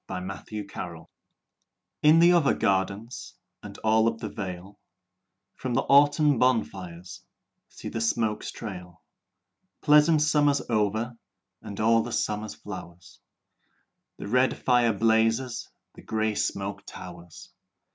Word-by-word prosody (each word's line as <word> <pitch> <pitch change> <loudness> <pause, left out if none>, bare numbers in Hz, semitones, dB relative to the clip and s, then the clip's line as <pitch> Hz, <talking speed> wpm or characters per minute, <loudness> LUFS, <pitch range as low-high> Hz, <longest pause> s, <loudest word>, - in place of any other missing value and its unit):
VI - - -5
Autumn 100 +1 -7
Fires 85 -2 -7 1.0
In 155 +2 +6
the 170 +1 +6
other 170 -5 +3
gardens 100 +5 -2 0.3
And - - -10
all 110 +1 +4
up 115 - -11
the 110 - -6
vale, 95 0 -7 0.7
From 125 -2 -4
the - - +3
autumn 145 -1 +4
bonfires 95 -8 -1 0.5
See - - -10
the 115 - -4
smoke 110 -1 0
trail! 90 -6 -8 0.8
Pleasant 150 +1 +5
summer 145 -1 +3 0.2
over 110 +2 -1 0.4
And 100 - -8
all 115 +1 +4
the 120 +2 -6
summer 105 -1 -2
flowers, 95 -2 -10 1.0
The - - -7
red 125 +4 +2
fire 120 -2 +3
blazes, 115 +3 +1 0.2
The - - -14
grey 110 0 -1
smoke 100 -1 -3
towers. 85 -2 -11
110 Hz, 120 wpm, -26 LUFS, 100-125 Hz, 1.0 s, In